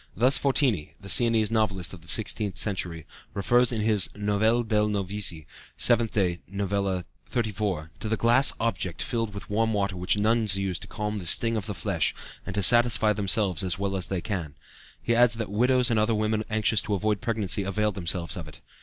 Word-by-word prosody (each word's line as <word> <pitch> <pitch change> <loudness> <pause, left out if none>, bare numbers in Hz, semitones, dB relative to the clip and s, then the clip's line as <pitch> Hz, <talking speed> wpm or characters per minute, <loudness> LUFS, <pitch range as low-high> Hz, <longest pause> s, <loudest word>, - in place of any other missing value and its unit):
Thus 125 +6 +4
Fortini, 130 - 0
the 100 -2 -10
Siennese 115 -3 +3
novelist 100 -6 0
of 90 - -11
the 85 - -19
sixteenth 105 -4 0
century, 85 -4 -2 0.3
refers 120 +5 +3
in 115 -3 -2
his 105 -3 +1
Novelle 105 +3 +1
dei 110 -2 -1
Novizi 100 -5 -1 0.3
(7th 115 -2 +3
Day, 90 -5 0
Novella 100 -2 -2 0.2
XXXIX) 105 -8 -2
to 110 - -5
"the 110 - 0
glass 120 +4 +4
object 95 -7 -2
filled 115 -3 -2
with 100 - -8
warm 110 +2 0
water 100 -2 -1
which 90 +3 0
nuns 110 -2 +2
use 95 -2 -2
to - - -10
calm 105 0 -4
the 90 - -7
sting 115 +5 0
of 110 -1 -3
the 105 - -4
flesh 95 -6 -1 0.3
and 100 - -5
to 100 - 0
satisfy 120 0 +5
themselves 100 -1 +1
as 90 -2 -1
well 100 0 -2
as 95 -2 -1
they 95 -2 -3
can"; 85 -9 -4 0.4
he 120 - -1
adds 120 0 +4
that 110 -3 -5
widows 125 +3 +2
and 110 - +2
other 110 +1 +1
women 110 0 0
anxious 110 0 +2
to 105 - -2
avoid 105 +1 -1
pregnancy 110 -4 0
availed 105 +2 -1
themselves 85 -2 -2
of 85 -4 -7
it. 75 - -13
105 Hz, 195 wpm, -26 LUFS, 95-115 Hz, 0.4 s, satisfy